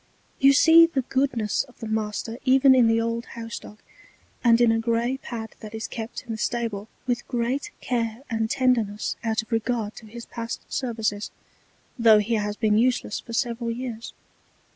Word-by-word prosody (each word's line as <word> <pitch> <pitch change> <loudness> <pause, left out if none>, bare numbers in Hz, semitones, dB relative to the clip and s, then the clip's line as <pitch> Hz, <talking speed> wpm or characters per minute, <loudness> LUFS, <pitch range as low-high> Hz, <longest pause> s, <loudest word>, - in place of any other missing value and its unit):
You 275 +1 +7
see 330 +3 +7
the 285 -6 -1
Goodness 255 -5 0
of 250 - -21
the 225 - -6
Master 220 +2 -3
even 265 +1 +6
in 250 -3 +5
the 225 0 +3
old 230 +1 -2
House 230 -1 -5
dog, 210 - -13 0.7
and 230 -1 +5
in 240 -1 +5
a 225 - +2
grey 235 +3 0
Pad 225 -4 -7
that 215 0 -9
is 220 - -4
kept 225 0 -6
in 240 - -8
the 220 - -4
Stable 225 -4 -2 0.2
with 245 -1 -2
great 245 +4 -1
Care 230 0 -2
and 225 -2 -1
Tenderness 235 -6 +1
out 220 -1 0
of 220 - -21
Regard 225 -1 -1
to 220 - -11
his 235 +2 -9
past 230 -1 -6
Services, 220 -5 -2 0.7
tho' 225 -2 +7
he 210 +3 0
has 210 -1 -1
been 215 -2 +3
useless 245 -3 +1
for 230 - -10
several 235 -1 -1
Years. 235 -1 -5
230 Hz, 180 wpm, -25 LUFS, 220-245 Hz, 0.7 s, You